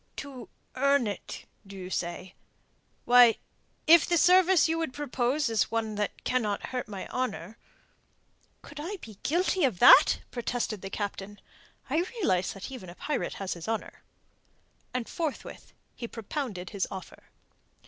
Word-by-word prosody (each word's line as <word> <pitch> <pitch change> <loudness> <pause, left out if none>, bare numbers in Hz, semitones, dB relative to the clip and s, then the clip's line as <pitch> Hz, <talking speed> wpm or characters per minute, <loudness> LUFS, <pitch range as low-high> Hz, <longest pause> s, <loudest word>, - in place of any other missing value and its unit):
"To 265 -4 -8 0.3
earn 280 0 +3
it, 205 -1 -6 0.2
do 195 - -10
you 185 0 -7
say? 175 +1 -4 0.7
Why, 245 -2 +7 0.5
if 335 0 +8
the 345 - +1
service 365 -1 +5
you 325 +1 0
would 320 -6 -3
propose 275 0 0
is 225 -1 +1
one 225 -1 -2
that 210 0 -3
cannot 215 -5 -1
hurt 250 -3 -4
my 200 -3 -7
honour...." 225 -6 -3 1.1
"Could 290 +1 -11
I 365 +7 -5
be 220 - -12
guilty 360 +3 +1
of 250 -9 +2
that?" - - +7
protested 235 -4 -3
the 195 - -6
Captain. 205 0 -5 0.5
"I 280 - -1 0.2
realize 185 - +1
that 195 +6 -8
even 210 -9 -8
a 175 - -11
pirate 295 +7 -3
has 195 -1 -3
his 170 -1 -9
honour." 225 -1 -4 0.9
And 250 -2 -3
forthwith 320 -4 -5 0.2
he 235 - -6
propounded 225 -5 -5
his 200 -3 -2
offer. 190 -3 -9
240 Hz, 150 wpm, -28 LUFS, 200-285 Hz, 1.1 s, if